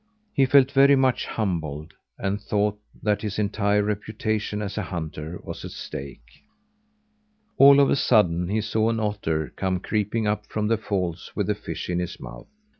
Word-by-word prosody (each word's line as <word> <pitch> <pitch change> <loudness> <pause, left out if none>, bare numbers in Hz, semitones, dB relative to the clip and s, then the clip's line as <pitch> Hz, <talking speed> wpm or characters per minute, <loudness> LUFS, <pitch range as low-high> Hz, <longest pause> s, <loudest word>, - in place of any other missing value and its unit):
He 135 -1 +3
felt 135 0 +5
very 140 +1 +6
much 130 -2 +1
humbled, 80 -7 -3 0.2
and 95 +1 -2
thought 105 0 0 0.2
that 105 -1 +1
his 105 -2 -4
entire 105 0 +1
reputation 105 0 -2
as 100 -2 -4
a 105 - -1
hunter 80 -2 -5
was - - -7
at - - -6
stake. 65 -3 -9 1.2
All 140 0 +9
of 140 - +4
a - - +4
sudden, 90 -10 +3
he 110 +2 +1
saw 110 +1 +1
an 115 -1 0
otter 100 -8 -2
come 95 -1 -1
creeping 105 +3 -1
up 105 0 -1
from 105 0 -2
the 115 - +3
falls 90 -6 -3
with - - 0
a - - +2
fish - - -6
in 90 0 -1
his 90 0 -4
mouth. - - -10
105 Hz, 175 wpm, -24 LUFS, 90-110 Hz, 1.2 s, All